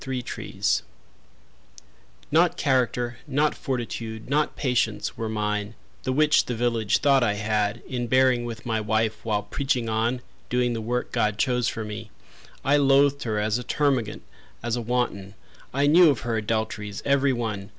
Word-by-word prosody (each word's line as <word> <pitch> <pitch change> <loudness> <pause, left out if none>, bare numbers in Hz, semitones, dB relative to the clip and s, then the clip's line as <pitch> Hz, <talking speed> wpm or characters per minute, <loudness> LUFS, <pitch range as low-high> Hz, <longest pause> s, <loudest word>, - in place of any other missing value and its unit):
Amos 130 -2 -4
Sibley - - -7 1.7
Not 170 +3 +3
character, 125 -3 0
not 145 +2 +2
fortitude, 115 -3 -4
not 150 +1 +1
patience 125 -5 0
Were 110 -1 -3
mine, 105 0 -2 0.3
the 130 - -2
which 150 +3 +4
the 125 - -3
village 115 -3 +1
thought 140 -1 +4
I 110 -4 +2
had 105 -1 -1
In 120 -2 -3
bearing 130 0 +3
with 115 -1 -7
my 110 -2 0
wife, 110 0 0
while 105 -2 0
preaching 125 +2 -1
on, 115 +3 0 0.3
Doing 125 -1 +1
the 115 - -3
work 120 +3 -2
God 105 -1 0
chose 125 0 +1
for 110 - -3
me. 105 +1 -7 0.6
I 140 +2 +4
loathed 140 0 +4
her 110 -2 -1
as 105 +2 0
a - - -5
termagant, 130 -6 0 0.4
as 120 - 0
a 120 - -2
wanton. 110 -5 -2 0.4
I 140 +2 +1
knew 165 +3 +7
of 140 - 0
her 115 -1 -2
adulteries, 110 -1 -2
every 140 0 +3
one. 110 -5 -3
120 Hz, 160 wpm, -25 LUFS, 110-130 Hz, 1.7 s, knew